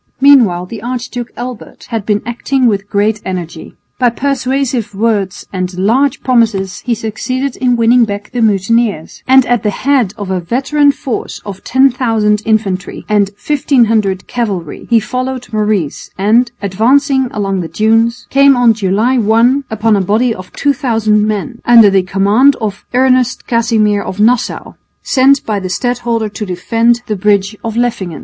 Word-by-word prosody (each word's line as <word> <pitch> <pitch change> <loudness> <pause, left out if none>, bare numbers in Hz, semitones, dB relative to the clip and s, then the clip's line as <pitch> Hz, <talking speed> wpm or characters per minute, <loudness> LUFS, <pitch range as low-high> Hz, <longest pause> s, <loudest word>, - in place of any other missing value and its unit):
Meanwhile 240 -11 +4
the 210 +3 -9
Archduke 245 0 -5
Albert 245 -2 -8
had 225 -4 -4
been 210 -1 0
acting 250 +3 -1
with 205 -3 0
great 210 +1 0
energy. 175 -3 -6 0.2
By 250 -1 +3
persuasive 260 -3 -2
words 205 -3 -1
and 185 -1 -4
large 255 +8 +1
promises 215 -6 +1
he 240 -2 -2
succeeded 255 +5 -3
in 250 -1 +1
winning 235 +1 +4
back 205 -1 -6
the 245 -1 -2
mutineers, 210 -3 0
and 265 0 +5
at 245 -2 +1
the 210 - 0
head 245 -2 0
of 200 -3 -5
a 185 - 0
veteran 275 - +1
force 270 -3 -5
of 195 -2 -8
10,000 235 -5 +1
infantry 205 -4 -1
and 205 -2 +1 0.2
1500 225 -9 +1
cavalry 200 -10 -4
he 235 -1 +4
followed 255 +2 -5
Maurice 210 -8 -1
and, 225 +5 +2
advancing 260 +7 +2
along 195 -2 -2
the 165 - -5
dunes, 225 +5 +1
came 275 -1 +5
on 240 -2 +4
July 215 +5 0
1 235 +6 +2
upon 220 0 +1
a 200 - +1
body 220 +6 +1
of 185 -3 -11
2000 225 -7 +1
men 215 +3 -4
under 230 -4 +6
the 195 -1 +3
command 200 +9 +2
of 210 -3 -5
Ernest 255 -1 +2
Casimir 225 -3 +1
of 190 - -7
Nassau, 230 +3 0 0.3
sent 270 +1 +3
by 210 -2 -1
the 185 -1 -5
stadholder 235 +2 -1
to 210 - -6
defend 230 +5 0
the 215 - -2
bridge 200 +1 +1
of 225 -1 -4
Leffingen. 205 -9 -2
225 Hz, 155 wpm, -13 LUFS, 205-250 Hz, 0.3 s, under